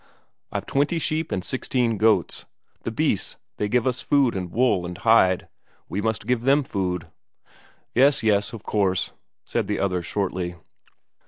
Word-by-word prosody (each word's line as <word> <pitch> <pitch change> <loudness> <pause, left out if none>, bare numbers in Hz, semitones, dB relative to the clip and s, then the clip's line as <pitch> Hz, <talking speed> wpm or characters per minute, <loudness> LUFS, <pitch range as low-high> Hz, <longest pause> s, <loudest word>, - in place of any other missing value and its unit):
I've - - -3
twenty 145 +5 +1
sheep 160 0 -1
and 90 - -1
sixteen 125 -4 -1
goats. 110 -5 +2 0.4
The - - -3
beasts, - - -1 0.2
they 105 - -1
give 125 +2 +2
us 125 -2 0
food 140 -6 +2
and 90 -2 -4
wool 115 -7 +2
and 90 0 -6
hide; 95 -5 +4 0.4
we 100 - -3
must 110 -1 -1
give 125 0 +1
them 140 +4 +3
food." 90 -7 -2 0.9
"Yes, 135 +2 +4
yes, 105 0 +2
of 115 -3 -9
course," 95 -3 0 0.3
said - - -1
the - - -1
other 90 -2 0
shortly. 90 -1 -2
110 Hz, 155 wpm, -24 LUFS, 95-125 Hz, 0.9 s, hide